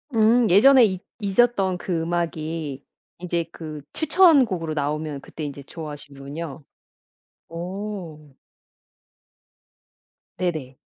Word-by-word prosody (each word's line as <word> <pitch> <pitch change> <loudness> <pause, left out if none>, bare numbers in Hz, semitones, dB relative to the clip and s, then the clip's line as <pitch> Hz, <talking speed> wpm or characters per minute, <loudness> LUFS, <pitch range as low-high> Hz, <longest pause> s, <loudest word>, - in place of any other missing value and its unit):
음 225 +1 +4
예전에 255 +7 +7
잊 185 -2 -2 0.2
잊었던 195 -2 +2
그 175 -2 -2
음악이 160 -4 -3 0.4
이제 170 -2 -1
그 155 -3 -8
추천곡으로 275 - +4
나오면 150 -1 -2
그때 160 - -8
인제 145 -1 -5
좋아하시는군요. 145 -1 -8 0.9
어. 170 -4 -6 2.0
네네. 155 -8 -3
165 Hz, 205 characters per minute, -24 LUFS, 150-195 Hz, 2.0 s, 예전에